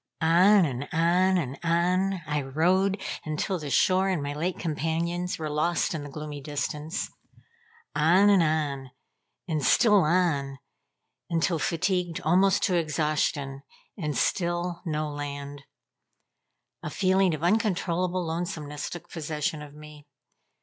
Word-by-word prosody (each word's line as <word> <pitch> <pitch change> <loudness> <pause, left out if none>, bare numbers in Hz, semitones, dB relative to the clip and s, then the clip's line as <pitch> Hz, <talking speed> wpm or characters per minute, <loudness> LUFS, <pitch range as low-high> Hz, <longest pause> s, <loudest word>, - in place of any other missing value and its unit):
On 175 +6 +5
and 135 -1 -4
on, 180 +3 +3
and 140 -5 -3
on 180 +3 +1
I 150 -1 -1
rowed 180 +8 +1 0.2
until 155 +5 -2
the 150 -2 -6
shore 185 +6 +3
and 175 -6 -1
my 145 0 -3
late 170 +5 -2
companions 170 +3 -2
were 155 - -4
lost 155 +4 0
in 155 -3 -4
the 145 - -8
gloomy 150 0 -7
distance. 150 +4 -4 0.8
On 175 +7 +5
and 195 -3 +5
on, 150 -4 -1 0.6
and 155 -4 -1
still 210 - +5
on, 150 -5 +1 0.7
until 165 0 +1
fatigued 175 +1 -1
almost 190 +5 +3
to 185 - +2
exhaustion; 150 -3 -1 0.3
and 150 -6 -3
still, 175 -1 -1
no 155 -1 -1
land. 145 -1 -6 1.2
A - - -5
feeling 185 0 +2
of 155 - -9
uncontrollable 185 -3 0
lonesomeness 160 -3 -4
took 175 - -8
possession 155 -1 -3
of 145 -1 -11
me. 150 -1 -13
160 Hz, 130 wpm, -27 LUFS, 150-180 Hz, 1.2 s, On